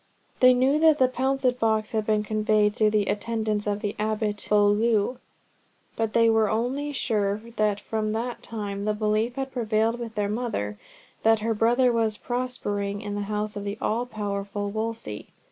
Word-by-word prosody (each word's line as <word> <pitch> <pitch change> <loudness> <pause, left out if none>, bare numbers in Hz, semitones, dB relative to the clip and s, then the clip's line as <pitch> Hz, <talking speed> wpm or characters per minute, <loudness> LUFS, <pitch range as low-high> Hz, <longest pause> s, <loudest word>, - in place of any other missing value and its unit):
They 255 0 +7
knew 265 +4 +3
that 315 -1 +5
the 260 - +4
pouncet 260 0 0
box 220 -2 +1
had 215 -2 -1
been 215 -1 +2
conveyed 215 0 +2
through 215 0 +3
the 210 -1 +1
attendants 215 0 -1
of 205 0 -1
the 205 -2 -3
Abbot 215 -1 -1
of - - -12
Beaulieu, 210 +3 +3 0.8
but 225 -1 -1
they 230 0 +5
were 225 -2 +3
only 255 +6 -1
sure 210 -7 0 0.2
that 210 -1 +1
from 215 0 -2
that 235 +2 -3
time 205 -3 -5
the 210 0 0
belief 215 +3 0
had 270 0 -3
prevailed 225 -1 0
with 230 -2 -6
their 205 -1 0
mother 200 - -3 0.4
that 225 -1 +3
her 225 +1 0
brother 240 +3 +3
was 220 -2 0
prospering 205 -5 -3
in 205 -2 -5
the 205 - -2
house 210 0 -2
of 205 - -4
the 200 +1 -4
all 235 +3 -1
powerful 205 -2 -3
Wolsey. 220 - -4
215 Hz, 180 wpm, -26 LUFS, 210-235 Hz, 0.8 s, They